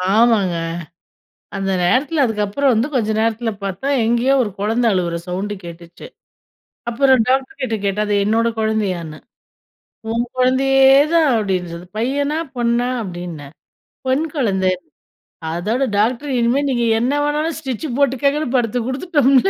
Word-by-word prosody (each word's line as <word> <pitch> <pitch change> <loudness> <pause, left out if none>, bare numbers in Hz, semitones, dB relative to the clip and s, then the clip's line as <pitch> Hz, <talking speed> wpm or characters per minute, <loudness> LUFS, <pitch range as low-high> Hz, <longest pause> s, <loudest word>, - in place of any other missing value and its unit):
ஆமாங்க. 220 -6 +3 1.0
அந்த 195 0 -1
நேரத்தில 275 - +2
அதுக்கப்புறம் 225 +5 0
வந்து 225 +4 +1
கொஞ்ச 225 -4 +1
நேரத்தில 225 +1 0
பார்த்தா, 195 +7 -4 0.2
எங்கேயோ 240 +4 +2
ஒரு 210 - -4
குழந்தை 225 +4 +1
அழுவுற 175 -2 -1
சவுண்டு 190 +3 -3
கேட்டுச்சு. 170 0 -11 0.8
அப்புறம் 260 +2 +3
டாக்டர் 270 +8 0
கிட்ட 240 -4 -1
கேட்டா, 200 +2 0
அது 205 - +1
என்னோட 225 +2 +2
குழந்தையான்னு, 190 -8 -2 0.9
"உன் 235 +1 0
குழந்தையே 265 +1 +4 0.2
தான்." 325 -3 +4
அப்படின்ச்சு 185 -5 -2 0.2
'பையனா? 285 +6 0 0.2
பொண்ணா?' 240 +1 +1
அப்டின்னே. 175 -6 -7 0.6
"பொண் 265 +5 +1
குழந்த." 190 -8 +1 0.8
அதோட 215 +10 -1
டாக்டர், 245 +7 0
இனிமே 240 +4 +2
நீங்க 240 -3 0 0.2
என்ன 250 +4 0
வேணாலும் 300 +2 -1
ஸ்டிச் 270 0 -4
போட்டுக்கங்கனு 280 +2 +1
படுத்துக் 240 -1 -1
குடுத்துட்டோம்ல. 275 +2 +2
235 Hz, 125 wpm, -19 LUFS, 205-270 Hz, 1.0 s, குழந்தையே